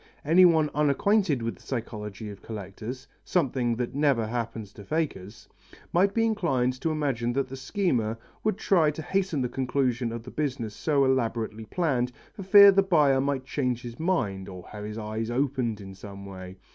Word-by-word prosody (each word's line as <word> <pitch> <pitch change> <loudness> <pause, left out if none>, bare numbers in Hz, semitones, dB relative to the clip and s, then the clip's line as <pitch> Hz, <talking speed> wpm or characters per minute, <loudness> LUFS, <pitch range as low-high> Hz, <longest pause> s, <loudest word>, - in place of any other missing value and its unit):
Anyone 165 -1 +5
unacquainted 150 - +2
with 115 - -3
the - - -20
psychology 105 -4 -5
of 100 - -12
collectors 110 +5 -7 0.2
something 130 -8 0
that 120 +2 -3
never 140 -5 +2
happens 115 -2 -4
to 105 - -11
fakers 110 - -3 0.5
might 190 +3 +4
be 225 0 +3
inclined 130 - 0
to 165 - 0
imagine 135 -6 -1
that 135 +1 0
the 135 - -6
schemer 130 - -1 0.3
would 215 -3 +1
try 170 -6 +3
to 150 +1 -5
hasten 185 -5 0
the - - 0
conclusion 125 -2 -1
of 115 0 -6
the 125 - -10
business 130 -8 -3
so 145 -3 +2
elaborately 115 -4 -1
planned, 130 -6 0 0.2
for - - -9
fear 200 +1 +9
the 195 0 +4
buyer 150 -8 +3
might 135 -1 -1
change 125 -3 -1
his 120 -1 -8
mind 115 - -1
or 90 -2 -10
have 105 -1 -8
his 105 +1 -6
eyes 110 +1 -3
opened 125 -3 -1
in 95 -1 -9
some 100 +1 -10
way. 95 -1 -9
130 Hz, 175 wpm, -27 LUFS, 110-155 Hz, 0.5 s, fear